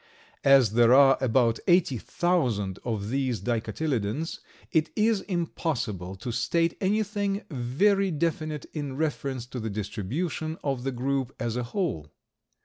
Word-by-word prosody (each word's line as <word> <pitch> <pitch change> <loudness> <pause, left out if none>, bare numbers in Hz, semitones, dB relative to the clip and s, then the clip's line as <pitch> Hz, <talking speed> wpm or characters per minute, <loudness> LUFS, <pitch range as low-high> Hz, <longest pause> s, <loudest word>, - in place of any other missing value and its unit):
As 135 -6 +6
there 120 +2 +5
are 135 -1 +7
about 120 -2 +2
eighty 175 - +3
thousand 120 - 0
of 110 -4 -3
these 130 -4 0
Dicotyledons, 120 - -2 0.3
it 160 -1 +2
is 215 -1 +2
impossible 125 - -3
to 110 +6 -5
state 165 +8 +1
anything 205 0 0
very 190 +11 +2
definite 155 -2 -2
in 145 -4 -4
reference 140 -5 -2
to 125 0 -6
the 110 -1 -3
distribution 125 - -3
of 135 -4 -1
the 135 - -1
group 135 +1 -2
as 115 -1 -2
a 125 - -1
whole. 120 - -2
135 Hz, 135 wpm, -27 LUFS, 115-165 Hz, 0.3 s, are